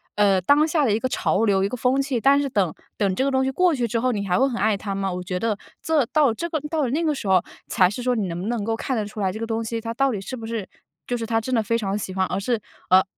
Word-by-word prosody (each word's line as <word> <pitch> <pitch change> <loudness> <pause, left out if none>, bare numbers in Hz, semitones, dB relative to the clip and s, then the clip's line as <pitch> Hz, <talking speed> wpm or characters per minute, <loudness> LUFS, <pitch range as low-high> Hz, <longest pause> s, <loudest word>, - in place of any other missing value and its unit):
呃， 200 -2 +3
当 290 - +4
下 310 -1 +1
的 245 - +2
一 215 - +1
个 255 - 0
潮 225 -4 +1
流， 195 -2 +2
一 195 - +1
个 250 - -4
风 255 +3 +2
气， 270 -3 -1
但 275 +4 +4
是 280 - -2
等 195 -9 +1 0.2
等 195 -3 +1
这 260 - +1
个 275 - +1
东 265 0 +2
西 265 - 0
过 360 +5 +3
去 245 -4 0
之 230 - -1
后， 255 +1 +2
你 200 -3 -3
还 180 - +2
会 265 - +4
很 240 - -4
爱 215 0 +3
它 200 0 -4
吗？ 195 0 -1
我 180 0 -4
觉 180 0 -3
得 220 -1 0 0.3
这 310 -5 +3
到 290 -7 +4
这 340 +10 -4
个 315 - -1
到 315 -1 0
了 255 - 0
那 295 +7 0
个 310 -2 +1
时 225 - -5
候 185 -2 +5 0.3
才 180 -1 +3
是 225 +5 -5
说 250 0 +2
你 210 -4 -1
能 170 0 -4
不 195 - -4
能 235 -2 -1
够 225 +2 -1
看 255 +2 -2
得 215 - -1
出 210 +1 -9
来 190 -1 +1
这 220 - -7
个 230 - -3
东 225 0 -1
西 230 +1 -3
它 230 0 -4
到 270 +2 +2
底 210 - -3
是 195 - -6
不 225 - -7
是 225 -4 -4 0.4
就 245 - -1
是 230 - -4
他 225 0 +1
真 255 +4 -4
的 230 - +3
非 230 +2 0
常 200 -3 -2
喜 190 -2 -5
欢， 190 0 +2
而 185 - -2
是 230 +3 0 0.3
呃， 185 +1 +7
225 Hz, 355 characters per minute, -23 LUFS, 200-260 Hz, 0.4 s, 呃